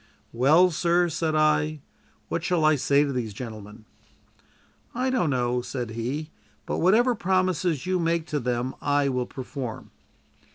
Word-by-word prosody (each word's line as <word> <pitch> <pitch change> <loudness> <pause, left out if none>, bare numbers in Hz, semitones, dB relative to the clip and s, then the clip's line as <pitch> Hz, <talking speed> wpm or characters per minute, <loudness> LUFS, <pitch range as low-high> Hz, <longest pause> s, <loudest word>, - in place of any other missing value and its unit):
"Well, 155 +10 +5
sir," 175 +2 +2
said 160 0 -1
I, 155 0 +2 0.5
"what 170 - -3
shall 165 -2 +1
I 155 0 +5
say 140 +1 +3
to 140 -2 -2
these 115 -5 -3
gentlemen?" 110 -2 -9 1.1
"I 255 +2 0
don't 235 - +1
know," 125 -2 0
said 120 -2 -5
he; 135 +8 -4 0.3
"but - - -2
whatever 225 +8 +4
promise 185 -5 0 0.2
you 185 0 0
make 165 -1 0
to 150 - -1
them 125 +1 -2
I 145 -1 +1
will 125 -2 -1
perform." 130 -2 -7
150 Hz, 150 wpm, -25 LUFS, 125-170 Hz, 1.1 s, Well